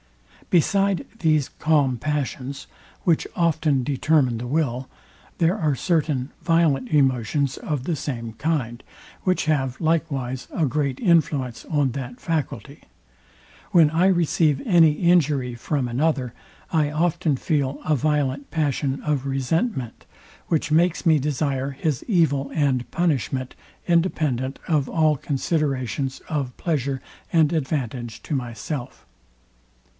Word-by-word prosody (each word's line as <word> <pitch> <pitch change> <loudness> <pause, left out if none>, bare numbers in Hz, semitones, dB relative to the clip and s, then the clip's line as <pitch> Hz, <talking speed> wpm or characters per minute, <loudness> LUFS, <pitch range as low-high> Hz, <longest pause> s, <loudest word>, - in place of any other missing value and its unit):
Beside 195 +2 +2
these 155 -4 +2
calm 145 -5 +1
passions, 140 -1 -3 0.4
which 165 -3 +2
often 155 -5 +2
determine 135 -3 +2
the 120 - -5
will, 130 -3 -1 0.5
there 170 +2 +2
are 155 -7 +1
certain 150 -4 0
violent 160 -7 +2
emotions 135 -1 +1
of 145 -5 -3
the 165 +3 -1
same 120 -6 -5
kind, 120 -2 -2 0.4
which 185 -3 +1
have 135 -4 0
likewise 140 -6 -1
a 165 - +1
great 140 -1 -1
influence 150 - +1
on 145 -4 +1
that 125 -1 -6
faculty. 160 -5 -3 0.9
When 160 -4 +5
I 170 +4 +3
receive 165 -5 +2
any 165 -6 +5
injury 150 -7 +2
from 125 +2 -2
another, 130 -1 0 0.4
I 155 -3 +3
often 160 -1 0
feel 140 -1 -1
a 155 - +3
violent 140 -1 0
passion 140 -3 -1
of 145 -3 -1
resentment, 135 - -1 0.4
which 155 -2 0
makes 170 +3 +2
me 160 -2 +5
desire 140 -1 -1
his 140 0 -2
evil 160 - +2
and 135 -5 +1
punishment, 135 -6 -1 0.3
independent 150 -7 +1
of 150 -5 +1
all 155 -2 +3
considerations 135 - -1
of 140 -5 -3
pleasure 140 -5 -1 0.3
and 160 -1 +3
advantage 130 -6 -3
to 155 - -2
myself. 125 +2 -5
145 Hz, 120 wpm, -23 LUFS, 130-160 Hz, 0.9 s, When